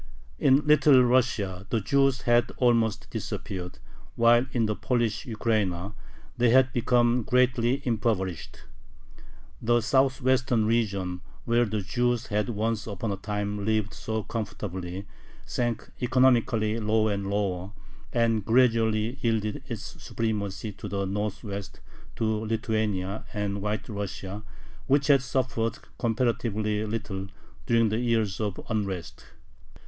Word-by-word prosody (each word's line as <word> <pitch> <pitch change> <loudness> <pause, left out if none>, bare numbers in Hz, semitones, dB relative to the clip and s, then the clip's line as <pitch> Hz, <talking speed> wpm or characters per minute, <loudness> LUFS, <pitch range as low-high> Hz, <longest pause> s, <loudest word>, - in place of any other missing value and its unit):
In 140 +2 +4
Little 145 -3 +6
Russia 110 -7 +1
the 115 - +1
Jews 135 +4 +2
had 120 0 +3
almost 115 -3 +2
disappeared, 90 -2 -5 0.4
while 120 +2 +5
in 115 -3 +1
the 105 0 -1
Polish 120 -3 -1
Ukraina 105 -5 -1 0.4
they 120 -1 +3
had 130 +1 +5
become 120 0 +3
greatly 125 +2 +2
impoverished. 110 -7 -1 1.0
The 120 +1 +3
southwestern 130 -2 +2
region, 100 -6 0 0.2
where 120 +1 +3
the 105 -1 -2
Jews 120 +3 0
had 105 +1 -1
once 110 0 -1
upon 105 +1 -3
a - - -1
time 105 +1 -3
lived 110 -1 0
so 110 -1 -3
comfortably, 95 -4 -5 0.4
sank 120 -2 -2
economically 120 -3 +3
lower 110 0 +2
and 100 -1 -3
lower, 100 -2 -1 0.4
and 115 -2 +2
gradually 115 0 +2
yielded 110 -2 0
its - - -7
supremacy 105 -2 -3
to 100 - -8
the 100 -1 -1
northwest, 100 0 -4 0.4
to - - -3
Lithuania 110 -3 -1
and 100 -1 -2
White 105 0 -2
Russia, 100 -1 -5 0.5
which 140 0 +3
had 140 -1 +5
suffered 125 -4 -1 0.2
comparatively 110 -3 0
little 105 -3 -4 0.4
during 115 -2 +3
the 110 +2 0
years 115 -5 0
of 105 -3 -2
unrest. 100 -6 -3
110 Hz, 120 wpm, -27 LUFS, 100-120 Hz, 1.0 s, Little